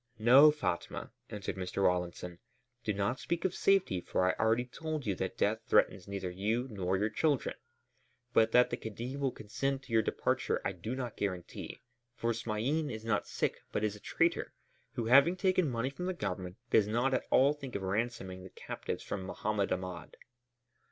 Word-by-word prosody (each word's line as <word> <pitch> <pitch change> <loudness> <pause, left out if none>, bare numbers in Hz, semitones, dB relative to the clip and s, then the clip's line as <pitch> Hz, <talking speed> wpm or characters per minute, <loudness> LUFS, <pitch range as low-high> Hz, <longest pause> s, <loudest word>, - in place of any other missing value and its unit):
"No, 130 +7 +8
Fatma," 150 - -2 0.2
answered 100 -2 -5
Mr. 95 +1 -2
Rawlinson, 90 -1 0 0.4
"do 110 - 0
not 100 +5 -1
speak 170 +1 -2
of 185 - +1
safety 190 - +2
for 90 - 0
I 95 - +3
already 115 +2 +3
told 155 +3 -4
you 100 - +1
that 95 +1 -4
death 110 +2 +2
threatens 95 - +3
neither 100 -2 -4
you 110 +7 -1
nor 95 -2 0
your 105 +2 0
children. 150 -5 +1 0.8
But 110 -1 +4
that 125 +1 +5
the - - -1
Khedive 120 +5 -5
will 140 -1 +1
consent 135 +6 -3
to 130 - -9
your 110 - +6
departure - - 0
I - - +1
do 95 +7 -5
not 125 -4 -5
guarantee, 90 -4 -4 0.3
for 115 0 0
Smain 120 +8 -1
is 110 -2 -6
not 110 -2 0
sick - - -1
but - - -1
is 105 -1 0
a - - -12
traitor, - - 0 0.4
who, 120 - -2
having 140 +9 +6
taken 185 -3 +2
money 125 +2 -1
from 180 +6 -5
the 185 - -1
Government, 90 - -4
does 105 -2 +5
not 120 +5 +1
at 130 - 0
all 140 +3 +5
think 140 -4 -8
of 100 - -2
ransoming 95 -2 -2
the 95 - -9
captives - - -5
from 100 - -4
Mohammed 100 +2 -1
Ahmed." 90 -3 -4
110 Hz, 185 wpm, -32 LUFS, 95-135 Hz, 0.8 s, No